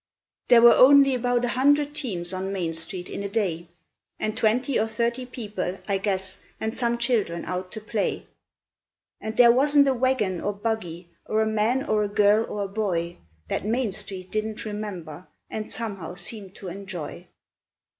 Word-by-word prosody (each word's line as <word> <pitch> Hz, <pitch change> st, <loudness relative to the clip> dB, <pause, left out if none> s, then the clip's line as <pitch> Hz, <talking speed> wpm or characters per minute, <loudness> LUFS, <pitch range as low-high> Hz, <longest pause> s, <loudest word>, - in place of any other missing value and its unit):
There 235 Hz, -1 st, +7 dB
were 240 Hz, -, +10 dB
only 275 Hz, +1 st, +7 dB
about 245 Hz, 0 st, +1 dB
a -, -, -1 dB
hundred 290 Hz, +3 st, +3 dB
teams 190 Hz, -, -2 dB
on 190 Hz, +1 st, -3 dB
Main 175 Hz, -4 st, -2 dB
Street 175 Hz, +2 st, -4 dB
in -, -, -5 dB
a 200 Hz, -, -3 dB
day, 180 Hz, -6 st, -1 dB, 0.5 s
And 215 Hz, 0 st, -2 dB
twenty 245 Hz, +3 st, +1 dB
or 220 Hz, -, +1 dB
thirty 235 Hz, +3 st, -1 dB
people, 205 Hz, -7 st, -4 dB
I 200 Hz, -2 st, 0 dB
guess, 190 Hz, -1 st, -2 dB, 0.2 s
and 220 Hz, +1 st, -3 dB
some 235 Hz, -1 st, 0 dB
children 230 Hz, -8 st, 0 dB
out 185 Hz, +1 st, -4 dB
to 220 Hz, -, -6 dB
play. 215 Hz, -1 st, -2 dB, 1.0 s
And 220 Hz, 0 st, -5 dB
there 240 Hz, -1 st, +8 dB
wasn't 280 Hz, +3 st, +4 dB
a 270 Hz, -, +3 dB
wagon 240 Hz, -8 st, 0 dB
or 205 Hz, -, -1 dB
buggy, 190 Hz, -5 st, -4 dB, 0.2 s
or 220 Hz, 0 st, +2 dB
a -, -, 0 dB
man 220 Hz, +5 st, +1 dB
or 215 Hz, -1 st, +1 dB
a -, -, 0 dB
girl 205 Hz, +2 st, +3 dB
or 205 Hz, -, -3 dB
a -, -, -3 dB
boy 180 Hz, -5 st, -2 dB, 0.3 s
That -, -, -2 dB
Main 230 Hz, +1 st, 0 dB
Street 185 Hz, -1 st, -3 dB
didn't 215 Hz, +1 st, -3 dB
remember, 185 Hz, -6 st, -6 dB, 0.2 s
and 215 Hz, -1 st, -5 dB
somehow 195 Hz, -7 st, -5 dB
seem 195 Hz, +2 st, -5 dB
to 195 Hz, -, -10 dB
enjoy. 185 Hz, -3 st, -7 dB
215 Hz, 175 wpm, -25 LUFS, 190-235 Hz, 1.0 s, were